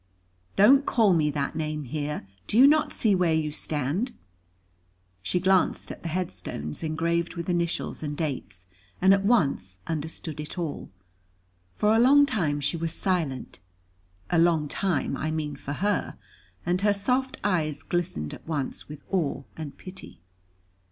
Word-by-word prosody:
"Don't 265 +8 +7
call 220 -8 +3
me 155 -3 +3
that 140 -1 -2
name 155 -1 -2
here. 145 -3 -4 0.2
Do 215 - 0
you 260 - +9
not 305 +2 +4
see 215 -3 +2
where 180 -4 +3
you 155 -1 0
stand?" 155 - -1 1.1
She 180 - 0
glanced 190 0 +2
at - - -9
the 170 - -4
headstones 155 - -4
engraved 165 +2 -1
with 170 -1 -5
initials 170 -1 -1
and 145 -1 -4
dates, 125 - -4 0.3
and 190 +1 +6
at 195 0 +2
once 140 - +1
understood 160 -1 -4
it 150 +4 -6
all. 165 -5 -4 0.9
For 210 +1 +3
a - - +4
long 280 +4 +7
time 160 - 0
she 145 +4 -1
was 165 0 -1
silent, 165 - -1 0.7
a 175 - +4
long 165 -3 +3
time 180 +1 -1
I 155 - -2
mean 155 -2 -2
for 140 +1 -6
her; 205 +6 -1 0.5
and 180 +2 +1
her 205 0 +3
soft 255 +6 0
eyes 155 -7 0
glistened 80 - -2
at - - -11
once 145 -4 -3
with 150 -1 -9
awe 170 -8 0
and 155 -3 -7
pity. 185 - -10
165 Hz, 155 wpm, -27 LUFS, 150-190 Hz, 1.1 s, you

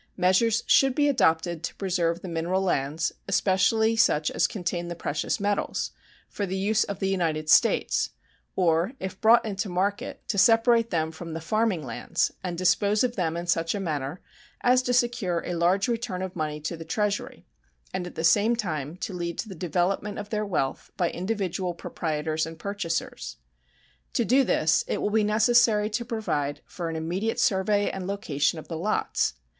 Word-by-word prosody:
Measures 205 +5 +3
should 270 -2 +4
be 290 -1 +3
adopted 165 - +2
to - - -5
preserve 175 -3 -1
the - - -5
mineral 175 +3 -1
lands, 155 -2 0 0.2
especially 215 +4 +2
such 160 -9 +3
as - - +2
contain 175 -3 -3
the 175 - -5
precious 150 -2 -2
metals, 205 0 -1 0.4
for 200 - -4
the 190 +1 -3
use 210 +3 +2
of 200 - -5
the 195 - -1
United 165 -5 -1
States, - - +3 0.5
or, 175 +4 +2
if 190 0 -6
brought 225 +2 +6
into 200 -1 -3
market, 195 +3 -2
to 200 - 0
separate 230 +1 +4
them 160 -2 0
from 165 0 -8
the - - -3
farming 215 0 0
lands - - -1
and 175 -2 -3
dispose 200 +4 +2
of 245 -1 0
them 170 -3 -1
in 170 - -4
such 165 0 0
manner 155 -4 -3 0.4
as 250 +1 +4
to 250 - -1
secure 240 -8 +1
a 180 - -3
large 175 +3 +2
return 230 -6 -2
of 185 -1 -6
money 155 -2 -3
to 155 +3 -4
the 165 - -8
Treasury 205 +5 -2 0.5
and 180 -1 -3
at - - -11
the 160 - -3
same 210 +7 +4
time 160 - -3
to 190 - -5
lead 170 -1 -4
to - - -3
the 195 - -7
development 185 +4 -1
of 205 0 -7
their 215 -1 -1
wealth 145 -8 -2
by 175 -2 +1
individual 185 -2 -2
proprietors 155 -1 -2
and 165 0 -9
purchasers. 195 -2 -4 0.8
To - - +1
do 270 +3 +4
this 160 -10 +2
it - - -1
will 205 - -1
be 220 0 +3
necessary 215 0 +3
to 235 +3 -1
provide 210 - -2
for 170 -2 -5
an 165 - -4
immediate 180 +8 -2
survey 205 +1 +2
and 185 -1 -5
location 165 -7 0
of 155 - -9
the 165 -2 -5
lots. 210 +5 0
185 Hz, 180 wpm, -26 LUFS, 165-210 Hz, 0.8 s, brought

